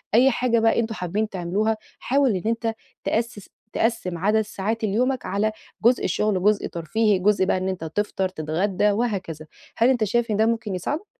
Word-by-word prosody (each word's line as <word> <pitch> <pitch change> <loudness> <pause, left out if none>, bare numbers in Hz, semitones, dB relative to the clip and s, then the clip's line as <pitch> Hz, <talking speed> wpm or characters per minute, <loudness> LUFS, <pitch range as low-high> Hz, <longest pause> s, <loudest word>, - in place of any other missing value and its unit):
أي 260 +4 +6
حاجة 240 -1 +1
بقى 225 +1 +3
أنتوا 225 -1 -1
حابين 205 +4 -2
تعملوها، 200 +4 -1 0.2
حاول 275 0 +2
إن 185 - -2
أنت 230 0 0 0.3
تأسِّس 225 -3 -2 0.2
تقسِّم 225 -6 0
عدد 210 +5 +2
ساعات 215 +2 -3
اليومك 245 +5 0
على 205 +3 0 0.3
جزء 245 +1 +4
شغل، 210 +2 +1
وجزء 205 +3 +2
ترفيهي، 195 +5 +1
جزء 195 0 +3
بقى 185 - +1
إن 185 +1 -2
أنت 185 -3 -4
تفطر 190 +2 -1
تتغدى 185 +5 0
وهكذا، 195 -8 -2 0.3
هل 235 +3 +4
أنت 245 -4 +2
شايف 235 +2 0
إن 205 - +1
ده 220 - +4
ممكن 225 -3 -1
يساعدك؟ 295 - -3
215 Hz, 175 wpm, -24 LUFS, 190-230 Hz, 0.3 s, أي